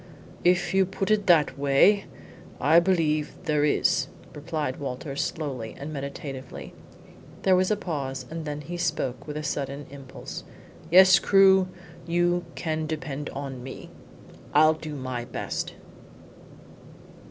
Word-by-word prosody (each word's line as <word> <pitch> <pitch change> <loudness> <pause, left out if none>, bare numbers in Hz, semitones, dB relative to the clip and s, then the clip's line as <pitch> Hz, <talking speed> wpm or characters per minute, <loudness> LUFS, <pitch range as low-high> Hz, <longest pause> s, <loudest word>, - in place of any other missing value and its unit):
"If 175 0 +3
you 190 -1 +4
put 195 +2 -2
it 210 -2 +2
that 155 -5 +4
way, 145 +9 +4 0.5
I 155 +5 +6
believe 160 -4 +1
there 150 -4 +1
is," 150 - +2 0.3
replied 150 -3 -3
Walters 140 +1 -4
slowly 130 -8 -4
and 150 +2 -6
meditatively. 140 -2 -7 0.7
There 190 -1 +5
was 185 0 +2
a 215 - +3
pause, 135 -8 -4
and 165 0 -4
then 150 -1 -4
he 175 +4 -6
spoke 130 -7 -2
with 150 0 -5
a 155 - -4
sudden 140 -1 -3
impulse. 135 -2 -9 0.5
"Yes, 185 +1 +8
Crewe; 190 -1 +5 0.4
you 175 +1 +1
can 155 -2 -2
depend 150 -2 -4
on 135 -2 -6
me. 130 +1 -9 0.6
I'll 155 +1 +7
do 155 -1 -7
my 130 -3 -4
best." 120 - -4
150 Hz, 130 wpm, -26 LUFS, 140-175 Hz, 0.7 s, Yes